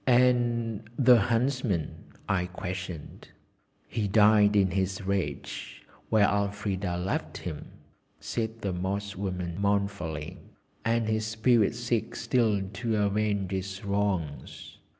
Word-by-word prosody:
"And 120 -3 +3 0.2
the 125 -3 +7
Huntsman?" 115 - 0 0.3
I 90 -2 +1
questioned. 90 -3 -6 0.6
"He 110 -3 -1
died 105 0 +5
in 95 -2 +4
his 95 +1 -1
rage, 95 -8 -3 0.3
where 105 -2 +5
Elfrida 100 -3 -1
left 90 +2 -2
him!" 80 -4 -6 0.5
said 115 -1 -3
the 100 -3 -1
Moss 100 +2 -3
woman 90 -3 -3
mournfully, 95 -5 -1 0.4
"and 115 0 +1
his 110 0 0
spirit 110 0 +3
seeks 120 -1 -2
still 110 -6 +2
to 115 +1 -1
avenge 100 -1 0
his 95 +1 -4
wrongs. 100 -7 -2
100 Hz, 110 wpm, -28 LUFS, 95-110 Hz, 0.6 s, the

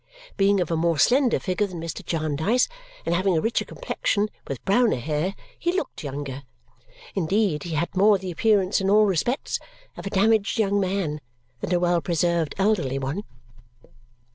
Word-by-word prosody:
Being 200 0 +3
of 175 -2 -1
a - - +2
more 165 0 +1
slender 250 - +4
figure 195 +2 -1
than 180 -3 -7
Mr. 165 0 -5
Jarndyce 160 - +1 0.4
and 170 - +1
having 185 0 +2
a - - +3
richer 225 +7 0
complexion, 215 - -1 0.2
with 135 -3 -6
browner 235 +4 +3
hair, 155 +8 -2 0.2
he 345 - +1
looked 370 - -3
younger. 140 -1 -5 0.7
Indeed, 190 -2 +1
he 165 -2 -3
had 170 +5 -2
more 200 +2 +5
the 190 -1 -5
appearance 200 +1 +2
in 190 - 0
all 210 +1 +6
respects 210 - 0 0.4
of - - -7
a - - -2
damaged 210 +2 +2
young 205 -2 +2
man 185 -6 -1 0.4
than 160 - -4
a 175 - +3
well 175 -1 +2
preserved 170 0 0
elderly 190 -10 +1
one. 135 +9 -3
185 Hz, 165 wpm, -24 LUFS, 160-205 Hz, 0.7 s, all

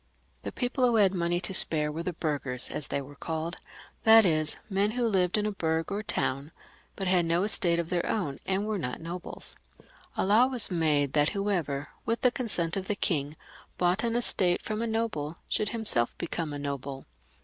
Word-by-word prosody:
The - - -5
people 250 +1 -2
who 240 - +1
had 200 -3 +4
money 175 -1 0
to 185 - -2
spare 150 -4 +4
were 160 +2 -4
the 180 - -3
burghers, 145 -6 -1
as 150 - -3
they 140 - -2
were 140 +2 -12
called; 160 +3 -4 0.5
that 225 -1 +7
is 155 -3 +3
men 200 0 +1
who 245 - +1
lived 190 -4 +2
in 210 - 0
a 210 - -1
bourg 160 -3 -2
or 200 +1 -2
town, 140 -7 -2 0.4
but 195 - -4
had 180 -1 +3
no 170 +2 +1
estate 175 -5 +3
of 170 0 -3
their 175 -1 0
own, 175 -11 -2
and 195 +2 0
were 215 -2 -2
not 125 -6 -4
nobles. 170 +2 -6 0.6
A - - +1
law 215 +6 +5
was 250 -6 +1
made 150 -5 +1
that 150 0 +3
whoever, 170 -9 -1 0.2
with 230 +1 -2
the 250 - +4
consent 195 -10 0
of 190 -1 -4
the 210 - 0
king, 150 -6 -1 0.4
bought 180 +5 +1
an 230 -1 0
estate 185 -7 +3
from 215 0 -3
a 230 - -1
noble, 210 -9 -2
should 210 - 0
himself 210 - 0
become 165 -2 -4
a 145 - -5
noble. 140 -1 -5
175 Hz, 200 wpm, -28 LUFS, 155-210 Hz, 0.6 s, that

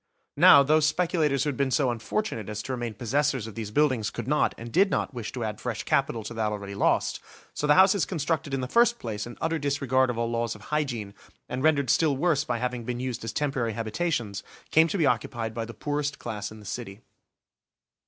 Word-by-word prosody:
Now, 140 - +8
those 155 +2 +3
speculators 155 -4 +1
who 150 - 0
had 140 - -4
been 140 -1 +1
so 130 -1 +2
unfortunate 115 - -3
as 105 0 -4
to - - -5
remain 120 -3 -3
possessors 130 +1 0
of 110 - -8
these 110 -1 -5
buildings 130 -3 +2
could 120 0 -6
not, 150 +2 +2
and 115 +1 -8
did 195 - +4
not - - -1
wish 120 -3 -5
to 125 - -3
add 105 -2 -4
fresh - - -3
capital 115 - 0
to 115 - -6
that 110 -2 -1
already 100 -1 -5
lost, 100 - +1 0.3
so 150 - -2
the 150 - +6
houses 190 -1 +5
constructed 160 -2 -2
in 135 -1 -1
the 125 - -3
first 235 - +4
place 110 - -5
in 120 - -10
utter 165 0 -1
disregard 135 -2 +1
of 120 - -2
all 115 0 -1
laws 115 -2 -1
of 105 - -13
hygiene, 120 -10 -2 0.3
and 125 - -4
rendered 140 -4 +3
still 150 -4 +2
worse 150 -2 +2
by 120 -6 -2
having 125 0 -3
been 120 +1 -4
used 125 -3 -4
as 115 - -3
temporary 135 -6 -1
habitations, 115 - -2 0.3
came 160 +1 +5
to 200 - -2
be 165 - +2
occupied 115 -3 -1
by 115 0 -3
the 115 - -8
poorest 145 +3 -2
class 105 -5 -5
in 110 - -11
the 105 - -14
city. 105 -1 -6
125 Hz, 220 wpm, -27 LUFS, 115-150 Hz, 0.3 s, Now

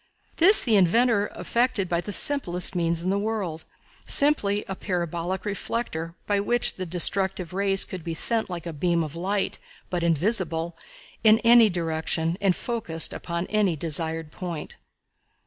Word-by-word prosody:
This 390 +6 +6
the 225 -4 +3
inventor 205 +3 +2
effected 235 -5 -1
by 170 0 -1
the 205 - -7
simplest 190 - +3
means 170 -1 -1
in 185 - -1
the 200 - 0
world 200 -7 -4 0.4
simply 210 -9 +2
a 190 - -4
parabolic 180 0 -4
reflector 195 -5 -4
by 205 -1 0
which 240 +4 +1
the 185 -1 -6
destructive 180 +1 +1
waves 195 0 +2
could 185 -3 -8
be 165 0 -5
sent 225 +6 +2
like 175 -2 -6
a 170 - -5
beam 170 +2 0
of 155 0 -7
light, 195 +4 -2 0.3
but 175 -1 -2
invisible, 170 -1 -1 0.5
in 220 0 +6
any 230 -1 +6
direction 165 -1 -2
and 195 -3 +2
focused 210 -9 -2
upon 170 0 -4
any 205 -4 0
desired 160 0 -2
point. 170 -4 -6
185 Hz, 150 wpm, -24 LUFS, 170-210 Hz, 0.5 s, This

